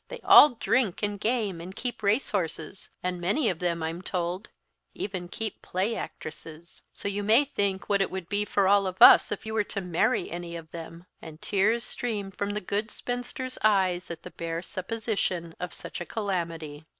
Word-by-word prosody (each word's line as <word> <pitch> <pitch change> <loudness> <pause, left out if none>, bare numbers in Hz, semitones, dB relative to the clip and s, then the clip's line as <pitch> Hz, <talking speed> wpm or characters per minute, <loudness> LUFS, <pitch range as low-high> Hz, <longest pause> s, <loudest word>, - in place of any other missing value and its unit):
They - - -8
all 295 -4 +9
drink, 225 -3 +1
and 205 -1 -1
game, 210 -6 -1
and 185 +3 -8
keep 240 +1 -4
race 215 +6 +1
horses; 180 -1 -3
and 180 -1 -2
many 210 - +2
of 170 - -7
them, 170 -2 -1
I'm 165 +2 -3
told, 180 +1 -3 0.5
even 185 -3 -4
keep 215 +3 -5
play 195 +5 -1
actresses; 160 -1 -8
so - - -5
you 200 0 -1
may 225 +7 +4
think 200 -8 -2
what 200 -1 +2
it 195 - +1
would 185 -3 -5
be 205 +2 0
for 200 -2 +1
all 200 0 +4
of 185 0 -5
us - - +9
if - - -4
you 220 - -4
were 215 -1 +2
to 200 - -4
marry 180 -3 0
any 170 0 -5
of 165 -2 -9
them," 165 +1 -9 0.2
and 160 -1 -10
tears 215 +6 +1
streamed 205 -7 -4
from 205 0 -2
the 210 - -2
good 205 +4 -2
spinster's 245 +2 -5
eyes 190 -4 +3
at 170 -1 -7
the - - -9
bare 165 0 -4
supposition 190 -4 -2
of 180 -1 -4
such - - -7
a - - -3
calamity. 165 -7 -3
195 Hz, 195 wpm, -27 LUFS, 175-215 Hz, 0.5 s, all